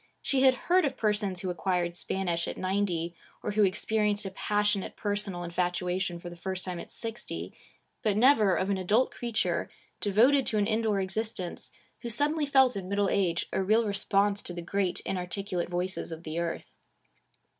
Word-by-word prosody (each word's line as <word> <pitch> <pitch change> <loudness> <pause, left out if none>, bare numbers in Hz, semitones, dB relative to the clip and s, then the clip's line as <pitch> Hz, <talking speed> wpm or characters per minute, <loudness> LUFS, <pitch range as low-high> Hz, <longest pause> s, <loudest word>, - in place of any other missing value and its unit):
She 270 -2 +2
had 260 -1 +6
heard 365 +1 +4
of 270 -2 -1
persons 205 -4 0
who 185 -2 -2
acquired 175 -1 -1
Spanish 175 -1 -1
at - - -5
ninety, 185 -3 -1 0.3
or - - -1
who 210 0 +3
experienced 210 +1 +1
a 195 - -4
passionate 205 0 0
personal 205 -4 -2
infatuation 180 +1 -1
for 175 - -9
the 175 - -7
first 185 +1 -4
time 180 -2 -4
at - - -8
sixty, 230 0 -5 0.5
but 210 -4 +1
never 220 -6 +5
of 190 +4 0
an 195 - 0
adult 210 +8 +2
creature, 235 -2 -1 0.3
devoted 240 +7 +4
to 215 - +2
an 205 - +3
indoor 220 -2 +1
existence, 190 -1 -3 0.3
who 240 - -5
suddenly 295 +6 +1
felt 265 -3 +5
in 190 -2 -5
middle 200 0 +1
age 175 -4 +1
a - - +1
real 215 +4 +3
response 200 0 +1
to 175 - -6
the 175 - -5
great 190 +1 -1
inarticulate 180 0 -3
voices 180 0 -3
of 165 +1 -7
the 160 +1 -3
earth. 170 -1 -4
200 Hz, 175 wpm, -29 LUFS, 180-215 Hz, 0.5 s, had